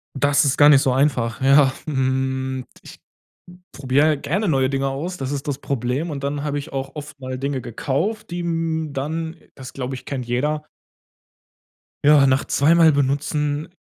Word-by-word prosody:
Das 145 Hz, +2 st, +3 dB
ist 135 Hz, -, +1 dB
gar 145 Hz, 0 st, +7 dB
nicht 140 Hz, -2 st, +7 dB
so 130 Hz, -, +2 dB
einfach, 130 Hz, -4 st, 0 dB
ja. 135 Hz, 0 st, +5 dB
Mhm, 130 Hz, -2 st, -1 dB, 0.2 s
ich -, -, -13 dB, 0.7 s
probiere 140 Hz, +2 st, +2 dB
halt 150 Hz, -3 st, +1 dB
gerne 195 Hz, +7 st, -1 dB
neue 135 Hz, -3 st, +2 dB
Dinge 135 Hz, 0 st, 0 dB
aus, 160 Hz, +7 st, -4 dB
das 135 Hz, -4 st, -4 dB
ist 140 Hz, 0 st, -4 dB
das 140 Hz, -2 st, -2 dB
Problem. 135 Hz, +4 st, -2 dB
Und 140 Hz, -2 st, -5 dB
dann 140 Hz, 0 st, -2 dB
habe 145 Hz, -1 st, -2 dB
ich 145 Hz, +2 st, -8 dB
auch 135 Hz, 0 st, -4 dB
oft 150 Hz, -1 st, -9 dB
mal 130 Hz, 0 st, -5 dB
Dinge 140 Hz, 0 st, -2 dB
gekauft, 160 Hz, -, -3 dB
die, 175 Hz, -, -4 dB
hm, 165 Hz, -2 st, -2 dB
dann 160 Hz, +4 st, -4 dB, 0.2 s
das 130 Hz, -2 st, -10 dB
glaube 130 Hz, 0 st, -4 dB
ich, 125 Hz, -, -9 dB
kennt 130 Hz, -3 st, -4 dB
jeder 150 Hz, +5 st, -1 dB, 1.4 s
ja, 145 Hz, -1 st, +6 dB
nach 130 Hz, +1 st, +2 dB
zweimal 160 Hz, +1 st, +4 dB
benutzen 145 Hz, +4 st, -1 dB
140 Hz, 175 wpm, -21 LUFS, 130-150 Hz, 1.4 s, gar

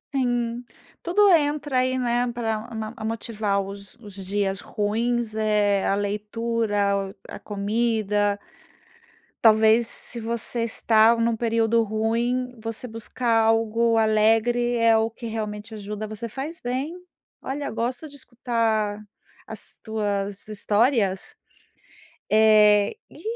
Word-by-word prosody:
Sim, 245 Hz, -2 st, -1 dB, 0.4 s
tudo 400 Hz, +4 st, +4 dB
entra 290 Hz, -4 st, +2 dB
aí, 255 Hz, 0 st, +1 dB
né, 245 Hz, 0 st, 0 dB
pra 225 Hz, -2 st, -3 dB, 0.3 s
a -, -, -9 dB
motivar 215 Hz, -3 st, -1 dB
os 200 Hz, 0 st, -9 dB
os 210 Hz, -4 st, -13 dB
dias 195 Hz, 0 st, -2 dB
ruins, 225 Hz, +2 st, -1 dB
eh, 210 Hz, -2 st, +1 dB
a 195 Hz, -, +2 dB
leitura, 205 Hz, -1 st, -1 dB
a -, -, -8 dB
comida 210 Hz, -1 st, 0 dB, 1.1 s
talvez 220 Hz, +1 st, +5 dB
se 235 Hz, -, 0 dB
você 230 Hz, +1 st, -1 dB
está 225 Hz, 0 st, +4 dB
num 230 Hz, 0 st, +1 dB
período 230 Hz, 0 st, +2 dB
ruim, 235 Hz, +4 st, -1 dB
você 225 Hz, +2 st, -4 dB
buscar 225 Hz, +1 st, -1 dB
algo 225 Hz, +1 st, +2 dB
alegre 225 Hz, +3 st, +2 dB
é 230 Hz, -1 st, +4 dB
o 220 Hz, 0 st, 0 dB
que 235 Hz, 0 st, -8 dB
realmente 215 Hz, 0 st, -5 dB
ajuda. 210 Hz, +1 st, -6 dB
Você 215 Hz, +2 st, -6 dB
faz 280 Hz, +8 st, -6 dB
bem. 260 Hz, +7 st, -3 dB, 0.5 s
Olha, 280 Hz, +2 st, -4 dB
eu -, -, -4 dB
gosto 245 Hz, +7 st, -3 dB
de 285 Hz, -, -14 dB
escutar 230 Hz, -5 st, -1 dB, 0.5 s
as -, -, -7 dB
tuas 205 Hz, -2 st, -2 dB
histórias. 210 Hz, -1 st, +1 dB, 1.0 s
Eh, 215 Hz, -, +5 dB
e, -, -, -15 dB
225 Hz, 120 wpm, -24 LUFS, 210-240 Hz, 1.1 s, talvez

